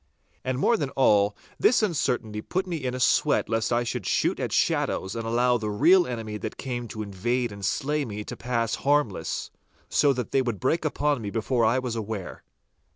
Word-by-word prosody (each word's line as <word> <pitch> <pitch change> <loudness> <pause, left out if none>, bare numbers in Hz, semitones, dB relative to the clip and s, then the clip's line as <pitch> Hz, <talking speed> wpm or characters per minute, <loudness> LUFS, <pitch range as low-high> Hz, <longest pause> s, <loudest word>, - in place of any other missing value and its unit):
And 130 -1 -1
more 230 - +3
than 145 -8 -2
all, 105 -5 +4 0.2
this 230 -1 +4
uncertainty 120 - -1
put 185 - -2
me 175 -3 -3
in 130 -4 -3
a - - -4
sweat 125 - +3
lest 115 +1 0
I 120 0 +2
should 120 -3 -4
shoot - - +1
at - - -2
shadows 95 +3 0
and 115 -1 -4
allow 120 +1 +2
the 105 -1 -3
real 170 - +5
enemy 110 -3 -4
that - - -6
came 120 -3 -4
to 110 -1 -5
invade 120 +5 -1
and 100 -1 -9
slay 150 +6 0
me 105 -4 -5
to - - -7
pass 115 -2 -1
harmless, 145 -7 0 0.4
so 145 - +4
that 125 -3 -4
they 135 - +3
would 120 -6 -2
break 160 +5 0
upon 145 -3 0
me 105 - -4
before 115 +2 0
I 115 +3 +3
was 125 -3 -2
aware. 110 -4 -5
120 Hz, 200 wpm, -26 LUFS, 110-135 Hz, 0.4 s, real